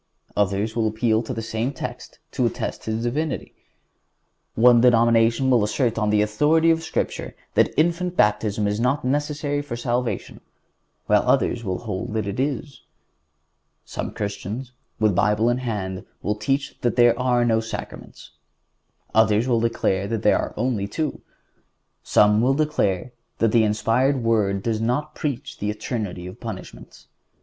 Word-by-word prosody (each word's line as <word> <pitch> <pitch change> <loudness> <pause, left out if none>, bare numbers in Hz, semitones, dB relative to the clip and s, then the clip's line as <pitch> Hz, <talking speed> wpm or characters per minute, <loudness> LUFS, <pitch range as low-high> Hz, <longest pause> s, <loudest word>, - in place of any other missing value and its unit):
Others 105 +2 0
will 115 -2 +1
appeal 110 0 +1
to 115 - -6
the 115 -3 -4
same 115 +3 -2
text 130 - -7
to - - +1
attest - - -4
His 110 +1 -2
Divinity. 145 +5 -2 1.0
One 120 +1 +6
denomination 115 +1 +4
will 120 -4 +4
assert 115 +2 0
on 105 -1 +1
the 105 0 +3
authority 150 +10 +3
of 165 0 +1
Scripture 160 - -3 0.2
that - - +3
infant 175 +3 +1
baptism 105 0 +2
is 105 +1 -1
not 125 +3 0
necessary 145 +1 -1
for 145 -5 -6
salvation, 120 0 -2 0.6
while - - +4
others 120 - +2
will 95 -3 -2
hold 105 -2 -5
that 110 -2 -1
it 100 +4 -4
is. 140 +1 -3 1.0
Some - - -5
Christians, 105 +5 -5 0.3
with 110 -2 +3
Bible 105 +5 +2
in 120 - -1
hand, 105 -5 -4 0.2
will 105 - +1
teach 135 +7 -2
that 120 - 0
there 120 -1 +6
are 125 -1 +2
no 115 -1 +3
sacraments. 115 0 -8 0.8
Others 110 +1 +3
will 120 -3 +2
say 100 -4 -1
that 110 0 -3
there 105 - +4
are - - -4
only 110 -3 -1
two. 155 +7 -3 0.8
Some 105 +1 +4
will 130 +3 +3
declare 125 -9 0 0.3
that 115 -1 +2
the 115 -1 +4
inspired 120 +5 +1
Word 100 -4 +1
does 110 -2 -1
not 145 +7 -1
preach 140 -3 -4
the 105 - -2
eternity 105 -4 -4
of 90 - -9
punishments. - - -9
115 Hz, 155 wpm, -23 LUFS, 105-130 Hz, 1.0 s, One